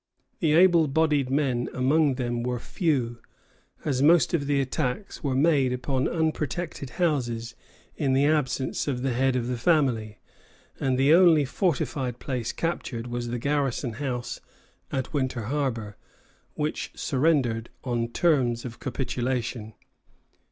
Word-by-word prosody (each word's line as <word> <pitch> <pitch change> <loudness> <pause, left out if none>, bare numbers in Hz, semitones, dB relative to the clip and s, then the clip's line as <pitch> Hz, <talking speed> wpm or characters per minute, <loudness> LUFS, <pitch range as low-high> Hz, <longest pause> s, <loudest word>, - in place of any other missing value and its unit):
The 160 -6 +2
able 170 -1 +5
bodied 145 -2 +2
men 130 -3 0
among 140 +2 +3
them 120 -2 -2
were 125 +1 -2
few, 125 - -1 0.7
as 135 -3 0
most 165 +4 +5
of 145 -5 0
the 145 -1 +2
attacks 135 - -3
were 135 -3 0
made 140 -2 +3
upon 130 +1 -1
unprotected 160 -2 -2
houses 120 -9 0 0.4
in 140 -4 0
the 135 +2 +3
absence 145 -4 0
of 130 -3 -2
the 135 -2 0
head 130 +1 +2
of 125 -2 0
the 125 -1 -3
family; 120 -8 +1 0.6
and 130 -1 +1
the 135 +4 +5
only 165 -4 +6
fortified 135 - -1
place 125 -4 -3
captured 135 -8 -3
was 120 0 -4
the 120 +1 -2
garrison 135 -2 -1
house 125 -1 -4 0.5
at 130 +1 -3
Winter 130 -5 -1
Harbor, 115 -5 -2 0.6
which 150 +1 -2
surrendered 130 -6 +1
on 120 -2 -1
terms 125 -4 +1
of 120 -1 -7
capitulation. 125 -3 -3
130 Hz, 135 wpm, -26 LUFS, 120-150 Hz, 0.7 s, only